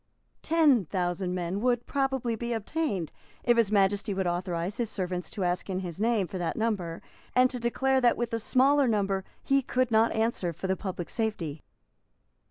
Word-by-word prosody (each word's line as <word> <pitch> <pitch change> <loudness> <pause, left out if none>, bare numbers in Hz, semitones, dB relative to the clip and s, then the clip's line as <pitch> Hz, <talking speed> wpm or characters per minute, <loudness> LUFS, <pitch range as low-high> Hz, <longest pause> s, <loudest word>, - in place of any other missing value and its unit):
Ten 300 - +4
thousand 180 +1 -2
men 180 +2 -2
would 245 -1 +1
probably 265 -4 0
be 235 +1 -3
obtained 225 - -2 0.3
if 240 - +4
His 225 -3 +3
Majesty 200 0 +2
would 190 -1 -1
authorise 175 +1 -2
his 235 -3 -1
servants 180 -3 -3
to 205 - -4
ask 180 +2 -1
in 185 0 -1
his 175 -1 -6
name 225 -2 +2
for 185 +2 -6
that 175 - -2
number, 200 -7 -2 0.3
and 255 0 +5
to 250 - -4
declare 265 +3 +1
that 240 -1 +4
with 235 -1 -2
a 230 - 0
smaller 270 +4 +3
number 195 -3 0 0.2
he 275 0 +3
could 255 -1 0
not 220 +1 +4
answer 220 -6 0
for 180 - -7
the 190 0 +1
public 185 -2 -5
safety. 170 - -3
210 Hz, 180 wpm, -28 LUFS, 185-240 Hz, 0.3 s, and